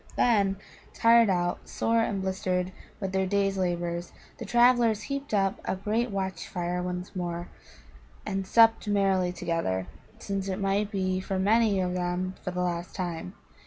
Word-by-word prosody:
Then, 200 -5 +3 0.4
tired 230 -1 +5
out, 175 -2 -1
sore 230 0 +1
and 200 -4 -1
blistered 185 -1 -1 0.3
with 195 -2 -3
their 190 0 +1
day's 195 0 +1
labours, 175 -2 -2 0.3
the - - -5
travellers 240 -3 +4
heaped 275 0 -4
up 195 -2 +1
a - - -1
great 215 +5 -1
watch 190 -2 -3
fire 175 0 -2
once 180 +1 -5
more, 175 -1 -4 0.8
and 195 -2 -2
supped 225 0 +5
merrily 195 -3 +2
together, 165 - -2 0.3
since 195 -1 -3
it 190 -1 -2
might 200 +1 0
be 185 -2 -1
for 190 0 -3
many 210 +1 +3
of 180 -1 0
them 180 +1 -2
for - - -2
the 180 0 -2
last 175 0 -3
time. 170 - -4
190 Hz, 160 wpm, -28 LUFS, 180-205 Hz, 0.8 s, tired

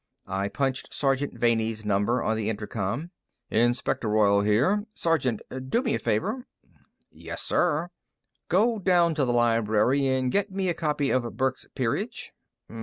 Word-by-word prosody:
I 95 +1 -2
punched 135 +1 -2
Sergeant 135 0 0
Vanney's 110 -2 +1
number 105 +4 +1
on 110 - +1
the 110 -1 -2
intercom. 110 - -3 0.4
"Inspector 120 0 +1
Royall 100 -1 +4
here, 135 - +2
Sergeant. 130 -9 0 0.3
Do 235 - +1
me 235 - 0
a - - 0
favor." 245 - -1 0.6
"Yes, - - -5
sir." 160 +4 +1 0.6
"Go 220 +5 +3
down 175 -3 +3
to 150 -3 +1
the 120 - 0
library 120 +3 +2
and 130 -1 +1
get 200 0 0
me 190 -1 -1
a - - +1
copy 150 -4 -1
of 120 -4 -1
Burke's 130 0 -1
'Peerage.'" - - -2
130 Hz, 145 wpm, -26 LUFS, 110-165 Hz, 0.6 s, Royall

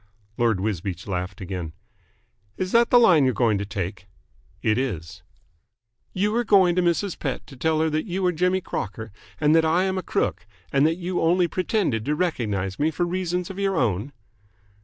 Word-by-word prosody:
Lord 115 -5 +1
Wisbeach 95 -3 -3
laughed 90 0 -4
again. 90 -4 -5 0.8
"Is 185 0 -2
that 235 0 +4
the 245 - +6
line 180 - +6
you - - +4
are - - -1
going 110 -5 +2
to 100 - -4
take?" 100 -1 -5 0.6
"It 110 +2 +2
is." 95 - -4 0.9
"You 205 +3 0
are 240 - +2
going 190 -6 +4
to 180 - +3
Mrs. 175 +2 0
Pett 135 -6 -3
to 135 - -13
tell 155 +4 +1
her 160 - +2
that 155 +6 -1
you 185 +1 -2
are 180 - +3
Jimmy 180 +3 +1
Crocker 110 - -5 0.3
and 150 +1 +4
that 165 - +5
I 165 +3 +2
am 190 0 0
a - - -3
crook 90 - -2 0.3
and 140 +2 +4
that 165 - +1
you 180 0 -2
only 175 +2 +3
pretended 180 - -1
to 150 - 0
recognise 105 - -2
me 150 +2 +2
for 165 +2 -1
reasons 180 0 -2
of 195 - -8
your 195 -1 0
own?" 110 +2 0
155 Hz, 195 wpm, -24 LUFS, -, 0.9 s, the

